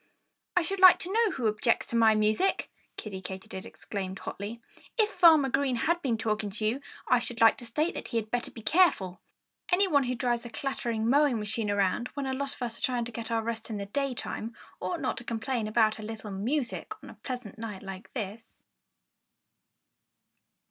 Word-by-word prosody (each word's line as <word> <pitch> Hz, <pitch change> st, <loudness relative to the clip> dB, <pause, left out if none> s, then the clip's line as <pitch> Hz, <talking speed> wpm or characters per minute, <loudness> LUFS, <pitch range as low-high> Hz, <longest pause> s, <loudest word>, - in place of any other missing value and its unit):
"I 355 Hz, -, +5 dB
should 390 Hz, +4 st, -3 dB
like 370 Hz, -1 st, +9 dB
to 370 Hz, -, -4 dB
know 455 Hz, 0 st, +4 dB
who 260 Hz, -10 st, -3 dB
objects 215 Hz, +2 st, +2 dB
to -, -, -1 dB
my 225 Hz, -1 st, +6 dB
music?" 215 Hz, -, +1 dB, 0.3 s
Kiddie 195 Hz, -3 st, -6 dB
Katydid 190 Hz, 0 st, -7 dB
exclaimed 190 Hz, -2 st, -5 dB
hotly. 205 Hz, +5 st, -6 dB, 0.4 s
"If 430 Hz, -2 st, +3 dB
Farmer 320 Hz, -5 st, +6 dB
Green 270 Hz, -1 st, +1 dB
has 335 Hz, +9 st, +2 dB
been 245 Hz, -7 st, 0 dB
talking 215 Hz, -1 st, -1 dB
to 215 Hz, +2 st, -4 dB
you, 240 Hz, +6 st, 0 dB, 0.3 s
I 250 Hz, -, +5 dB
should 240 Hz, 0 st, -6 dB
like 225 Hz, 0 st, +7 dB
to 240 Hz, -, -7 dB
state 305 Hz, +9 st, 0 dB
that -, -, -6 dB
he 235 Hz, -, -2 dB
had 215 Hz, -1 st, -2 dB
better 245 Hz, 0 st, -1 dB
be 225 Hz, -, -11 dB
careful. 210 Hz, -, +3 dB, 0.5 s
Anyone 355 Hz, -7 st, +4 dB
who 250 Hz, 0 st, -1 dB
drives 240 Hz, -1 st, 0 dB
a 240 Hz, -, -7 dB
clattering 230 Hz, -2 st, -2 dB
mowing 280 Hz, -1 st, +4 dB
machine 210 Hz, 0 st, -2 dB
around, 205 Hz, +4 st, +1 dB
when 280 Hz, -1 st, -2 dB
a 265 Hz, -, -1 dB
lot 275 Hz, +1 st, -3 dB
of -, -, -6 dB
us 230 Hz, -1 st, -4 dB
are -, -, -12 dB
trying 245 Hz, -2 st, 0 dB
to 240 Hz, -, -6 dB
get 225 Hz, 0 st, -6 dB
our 225 Hz, -1 st, 0 dB
rest 230 Hz, 0 st, -4 dB
in 215 Hz, -, -3 dB
the 200 Hz, -, -4 dB
daytime, 240 Hz, -1 st, -3 dB, 0.2 s
ought 185 Hz, 0 st, -3 dB
not -, -, -1 dB
to -, -, -6 dB
complain 230 Hz, 0 st, -2 dB
about 215 Hz, 0 st, +3 dB
a -, -, -6 dB
little 215 Hz, -1 st, -6 dB
music 235 Hz, -, -2 dB
on -, -, -9 dB
a -, -, -17 dB
pleasant 245 Hz, -5 st, -6 dB
night 210 Hz, -4 st, -6 dB
like 195 Hz, +1 st, -8 dB
this." 225 Hz, -1 st, -6 dB
230 Hz, 200 wpm, -29 LUFS, 215-270 Hz, 0.5 s, like